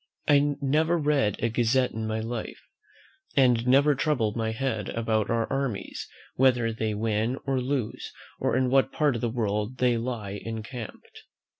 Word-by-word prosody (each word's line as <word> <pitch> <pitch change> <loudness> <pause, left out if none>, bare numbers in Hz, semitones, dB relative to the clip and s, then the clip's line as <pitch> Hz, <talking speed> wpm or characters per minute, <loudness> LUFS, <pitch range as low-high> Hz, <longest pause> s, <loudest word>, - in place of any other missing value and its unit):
I 145 0 +4
never 155 +5 +2
read 145 - +2
a 115 - +3
gazette 120 +3 +2
in 110 0 -4
my 110 0 -2
life; 115 0 -5 0.7
and 125 -3 +4
never 140 +3 +5
trouble 135 -7 0
my 110 -1 -1
head 110 -4 -2
about 110 -2 0
our 115 -1 +1
armies, 135 -6 -3 0.2
whether 125 -3 +3
they 110 -1 -2
win 110 +3 0
or 135 -2 0
lose, 130 -3 -3 0.3
or - - +1
in 130 -1 +1
what 135 0 +3
part 150 -3 +2
of 120 - -4
the 120 - 0
world 110 +1 -2
they 125 -1 +2
lie 110 -5 -4
encamped." 115 +1 -8
120 Hz, 160 wpm, -27 LUFS, 110-135 Hz, 0.7 s, never